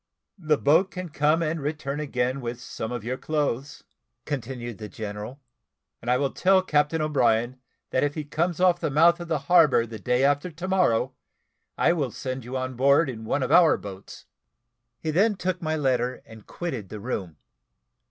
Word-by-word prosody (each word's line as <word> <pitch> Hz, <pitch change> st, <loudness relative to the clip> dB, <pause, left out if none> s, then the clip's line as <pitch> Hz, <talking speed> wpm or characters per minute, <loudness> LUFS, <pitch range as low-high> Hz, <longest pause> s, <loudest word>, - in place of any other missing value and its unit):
"The 155 Hz, -4 st, +2 dB
boat 160 Hz, +8 st, +3 dB
can 185 Hz, -2 st, -6 dB
come 150 Hz, +2 st, +2 dB
and 160 Hz, 0 st, -2 dB
return 145 Hz, -1 st, -3 dB
again 130 Hz, -2 st, -1 dB
with 120 Hz, 0 st, -5 dB
some 115 Hz, -1 st, -6 dB
of 120 Hz, -3 st, -4 dB
your 125 Hz, +3 st, -3 dB
clothes:" 140 Hz, -3 st, -2 dB, 0.4 s
continued 120 Hz, -5 st, -5 dB
the 105 Hz, -1 st, -7 dB
general; 105 Hz, +5 st, -7 dB, 0.6 s
"and 120 Hz, -, -5 dB
I 125 Hz, -, +4 dB
will 135 Hz, 0 st, 0 dB
tell 190 Hz, 0 st, +3 dB
Captain 150 Hz, -1 st, +1 dB
O'Brien 120 Hz, -4 st, +1 dB, 0.3 s
that 130 Hz, -, +1 dB
if 145 Hz, 0 st, 0 dB
he 155 Hz, -, -3 dB
comes 165 Hz, +4 st, -1 dB
off 180 Hz, -1 st, +4 dB
the -, -, -1 dB
mouth 165 Hz, +5 st, +4 dB
of 175 Hz, -, -6 dB
the -, -, -1 dB
harbour 160 Hz, -9 st, +5 dB
the 110 Hz, -1 st, -9 dB
day 125 Hz, +6 st, +1 dB
after 145 Hz, +5 st, +2 dB
to 170 Hz, +3 st, -7 dB
morrow, 135 Hz, -10 st, +2 dB, 0.6 s
I 170 Hz, -, +3 dB
will 145 Hz, -7 st, -1 dB
send 130 Hz, +2 st, -5 dB
you 125 Hz, +3 st, -4 dB
on 130 Hz, 0 st, -3 dB
board 140 Hz, +3 st, +3 dB
in 110 Hz, -2 st, -9 dB
one 135 Hz, +5 st, 0 dB
of 130 Hz, -, -2 dB
our 170 Hz, -3 st, +6 dB
boats." 100 Hz, -1 st, -10 dB, 0.7 s
He 160 Hz, -, -3 dB
then 205 Hz, +7 st, +3 dB
took 185 Hz, -1 st, -2 dB
my 155 Hz, -1 st, -1 dB
letter, 130 Hz, -3 st, 0 dB
and 110 Hz, -5 st, -14 dB
quitted 130 Hz, -, -5 dB
the 105 Hz, -, -7 dB
room. 100 Hz, -, -4 dB
140 Hz, 185 wpm, -25 LUFS, 120-160 Hz, 0.7 s, our